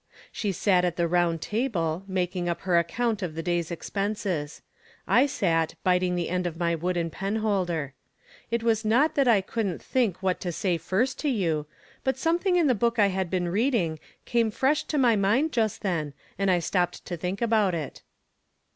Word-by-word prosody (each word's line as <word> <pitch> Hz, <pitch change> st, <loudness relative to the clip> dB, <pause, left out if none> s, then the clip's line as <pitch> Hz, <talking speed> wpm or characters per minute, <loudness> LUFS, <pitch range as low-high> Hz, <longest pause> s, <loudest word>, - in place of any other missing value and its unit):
She 205 Hz, -, -2 dB
sat 185 Hz, -1 st, +2 dB
at 175 Hz, -2 st, 0 dB
the 170 Hz, -1 st, +1 dB
round 170 Hz, -1 st, +1 dB
table, 195 Hz, -8 st, -1 dB
mak 185 Hz, -1 st, -1 dB
ing 175 Hz, -1 st, -1 dB
up 170 Hz, -, -3 dB
her 180 Hz, -2 st, +3 dB
account 215 Hz, +6 st, -1 dB
of 170 Hz, -4 st, -4 dB
the 165 Hz, -, -4 dB
day's 175 Hz, -1 st, -1 dB
expenses. 190 Hz, -4 st, -3 dB, 0.4 s
I 265 Hz, +3 st, +5 dB
sat 165 Hz, -, 0 dB
biting 180 Hz, -1 st, +2 dB
the 175 Hz, -2 st, -1 dB
end 180 Hz, -1 st, 0 dB
of 165 Hz, -1 st, -6 dB
my 170 Hz, -1 st, +1 dB
wooden 170 Hz, 0 st, -1 dB
penholder. 190 Hz, -7 st, -1 dB, 0.6 s
It 230 Hz, 0 st, -1 dB
was 225 Hz, -1 st, +2 dB
not 260 Hz, +9 st, +3 dB
that 275 Hz, -3 st, +2 dB
I 220 Hz, -5 st, +5 dB
couldn't 195 Hz, -3 st, -3 dB
think 220 Hz, -8 st, -1 dB
what 185 Hz, -1 st, +1 dB
to 175 Hz, -, -3 dB
say 175 Hz, 0 st, -1 dB
first 215 Hz, -, 0 dB
to 300 Hz, -, 0 dB
you, 165 Hz, -, 0 dB, 0.4 s
but 265 Hz, -, +1 dB
SQHiething 345 Hz, +6 st, +1 dB
in 340 Hz, -, +3 dB
the 265 Hz, -, +4 dB
book 235 Hz, +1 st, 0 dB
I 205 Hz, -2 st, +5 dB
had 190 Hz, -2 st, -2 dB
been 180 Hz, -1 st, -1 dB
reading 200 Hz, -, +1 dB, 0.3 s
came 235 Hz, -2 st, +2 dB
fresh 270 Hz, +7 st, +1 dB
to 300 Hz, -, -2 dB
my 245 Hz, -4 st, +4 dB
mind 220 Hz, +11 st, +2 dB
just 220 Hz, -5 st, 0 dB
then, 160 Hz, -7 st, -2 dB, 0.2 s
and 195 Hz, 0 st, 0 dB
I 180 Hz, -, +4 dB
stopped 175 Hz, +1 st, -1 dB
to 175 Hz, -, -4 dB
think 180 Hz, +3 st, -3 dB
it 230 Hz, -1 st, 0 dB
out. 185 Hz, -9 st, 0 dB
190 Hz, 190 wpm, -26 LUFS, 175-230 Hz, 0.6 s, I